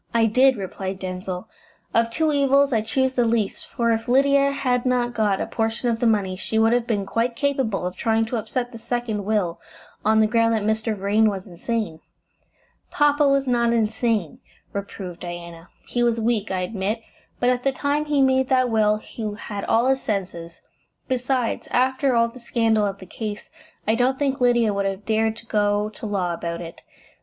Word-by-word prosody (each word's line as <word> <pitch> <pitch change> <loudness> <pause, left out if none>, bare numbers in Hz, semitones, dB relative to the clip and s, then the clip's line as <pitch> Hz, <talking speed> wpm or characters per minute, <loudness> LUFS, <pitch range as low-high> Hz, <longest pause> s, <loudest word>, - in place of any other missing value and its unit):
"I 230 -1 +5
did," 255 +4 +4
replied 190 0 -5
Denzil. 185 +1 -5 0.5
"Of 230 0 +3
two 315 +6 +1
evils 280 -1 +3
I 220 - +2
chose 260 +4 0
the 245 - +2
least, 225 -3 -1
for 235 -1 0
if 225 +1 -1
Lydia 275 +2 +4
had 250 -3 0
not 245 -1 +1
got 210 -4 +1
a - - -1
portion 225 +2 -1
of 230 -1 0
the 240 - +2
money 200 -4 +1
she 220 +3 -3
would 225 +1 +4
have 240 -1 +1
been 205 -4 0
quite 230 +4 -1
capable 260 -8 0
of 180 0 -3
trying 225 +2 +1
to 235 +2 -3
upset 240 +3 -3
the 230 - -9
second 225 -4 -3
will 200 -6 0 0.4
on 220 +1 +4
the 220 - +5
ground 230 0 +2
that 215 - -1
Mr. 220 0 0
Vrain 210 +3 +3
was 195 -2 -5
insane." 195 -1 -3 0.9
"Papa 290 0 +3
was 275 0 +2
not 235 -2 +2
insane," 220 -5 0 0.3
reproved 190 -3 -6
Diana. 170 -1 -8 0.2
"He 245 - -2
was 235 -1 +2
weak, 220 -2 0
I 185 -1 -1
admit, 205 +4 -2 0.4
but 245 0 +3
at 250 -1 0
the 275 - +1
time 285 +2 -1
he 290 -2 +2
made 265 0 +2
that 255 -2 +3
will 215 -1 +3
he 215 0 -6
had 205 -2 -6
all 230 +2 +3
his 265 0 +2
senses. 175 -5 -4 0.5
Besides, 255 -1 -1
after 260 +1 +2
all 230 0 +4
the 235 +2 -12
scandal 225 -3 +1
of 195 0 -4
the 190 - -11
case, 210 +2 -6 0.4
I 220 - +4
don't 250 +3 +2
think 275 -2 -1
Lydia 240 -3 +3
would 200 0 0
have 195 +1 -4
dared 220 0 +1
to 230 - -13
go 210 -1 +1
to 215 +1 -7
law 185 -4 -1
about 170 0 -4
it. 165 -1 -9
225 Hz, 195 wpm, -23 LUFS, 205-250 Hz, 0.9 s, I